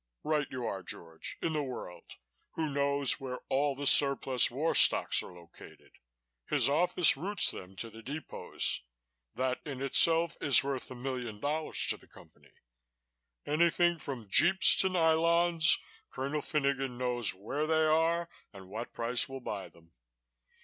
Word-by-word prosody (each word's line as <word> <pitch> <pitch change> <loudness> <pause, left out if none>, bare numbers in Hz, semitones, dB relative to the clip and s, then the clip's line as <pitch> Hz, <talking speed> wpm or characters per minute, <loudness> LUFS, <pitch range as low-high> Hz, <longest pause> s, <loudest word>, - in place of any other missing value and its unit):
"Right 150 -2 -1
you 125 -2 -6
are, 100 -4 -4
George, 80 -2 -4
in 165 - -1
the 155 - -1
world 125 -10 -8 0.4
who 160 -2 -3
knows 140 -1 +1
where 130 -2 -6
all 140 +1 0
the 145 +1 -6
surplus 135 -3 +4
war 145 +7 -1
stocks - - +4
are - - -11
located. 85 -1 -16 0.6
His - - +3
office 170 +4 +3
routes 195 +9 +2
them 95 +1 -11
to 115 +4 -7
the 110 +1 -12
depots. 145 +7 -3 0.5
That 130 +1 -2
in 140 -4 -7
itself 165 +4 +2
is 140 - +5
worth 135 -2 -5
a 130 - -9
million 125 -4 -6
dollars 155 +5 -2
to - - -3
the - - -22
company. - - -19 1.0
Anything 170 +2 +1
from 130 -8 -7
jeeps 190 - +5
to 190 - +4
nylons, 170 -1 +3 0.3
Colonel 140 +3 -4
Finogan 135 -4 -2
knows 120 -5 -1
where 140 +11 -4
they 160 0 +2
are 165 +2 +1 0.2
and 95 -2 -14
what 110 +4 -7
price 120 +2 0
will 135 0 -7
buy 100 -5 -6
them. 85 0 -23
140 Hz, 150 wpm, -30 LUFS, 120-160 Hz, 1.0 s, is